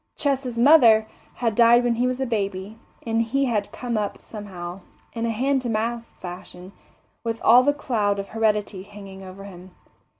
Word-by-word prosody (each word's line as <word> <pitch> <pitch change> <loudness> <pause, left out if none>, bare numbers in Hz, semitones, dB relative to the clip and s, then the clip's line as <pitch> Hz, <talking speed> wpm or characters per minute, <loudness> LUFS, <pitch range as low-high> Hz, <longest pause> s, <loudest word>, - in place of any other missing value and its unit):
Ches's 270 -4 -1
mother 235 -5 +6 0.3
had 230 -2 -1
died 235 +2 +5
when 240 -1 +2
he 245 +2 0
was 255 0 -2
a 265 - 0
baby, 205 -2 -3 0.3
and 225 0 +1
he 270 +5 0
had 210 -5 -1
come 240 -3 -3
up 205 -1 -3
somehow, 185 -4 -8 0.3
in 230 0 -2
a - - -1
hand 265 +4 0
to 245 - -4
mouth 230 +1 -2
fashion, 180 +1 -9 0.5
with 230 -1 -3
all 240 +3 +7
the 285 +3 +3
cloud 220 -8 -1
of 200 0 -5
heredity 210 -3 0
hanging 195 -1 -11
over 190 +1 -10
him. 185 -2 -12
225 Hz, 175 wpm, -23 LUFS, 200-240 Hz, 0.5 s, all